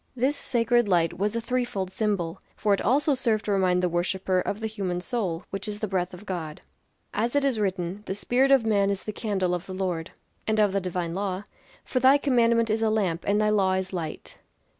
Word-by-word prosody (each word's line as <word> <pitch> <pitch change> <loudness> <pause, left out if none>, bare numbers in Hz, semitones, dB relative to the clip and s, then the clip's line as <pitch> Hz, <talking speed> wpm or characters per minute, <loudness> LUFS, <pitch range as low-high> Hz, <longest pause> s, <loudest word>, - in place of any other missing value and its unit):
This 260 +4 +1
sacred 240 -3 +2
light 175 -2 +1
was 205 +3 0
a - - +1
three 250 +2 0
fold 190 -6 -4
symbol, 195 -6 -1
for 210 -1 +2
it 195 - +1
also 280 +5 +3
served 230 -5 0
to 210 - -1
remind 185 -2 +2
the - - +4
worshipper 185 +2 0
of 200 +3 -2
the 220 - -4
human 195 -5 -2
soul, 180 -4 -2
which 195 +1 -4
is 210 0 -4
the 215 - -2
breath 185 -2 -1
of 180 +3 -11
God; 165 -6 -5 0.5
as 235 +5 -1
it 285 -1 +3
is 260 -5 +1
written, 190 -1 -2
"The 190 - -2
spirit 250 +6 +2
of 270 -4 +5
man 200 -2 +3
is 200 -1 -2
the 215 - -5
candle 195 -5 -1
of 180 +1 -3
the 185 - -6
Lord." 180 -3 -2 0.4
And 215 0 +2
of 210 -2 +4
the 195 - +1
divine 180 -2 -3
law 195 0 -2 0.4
"For 255 - -1
thy 260 +3 +6
commandment 235 -5 +3
is 220 +1 0
a 220 - +3
lamp; 190 -6 0
and 205 +1 +3
thy 210 0 +2
law 195 -3 +3
is 190 0 -2
light." 160 -4 -5
200 Hz, 225 wpm, -26 LUFS, 185-230 Hz, 0.5 s, thy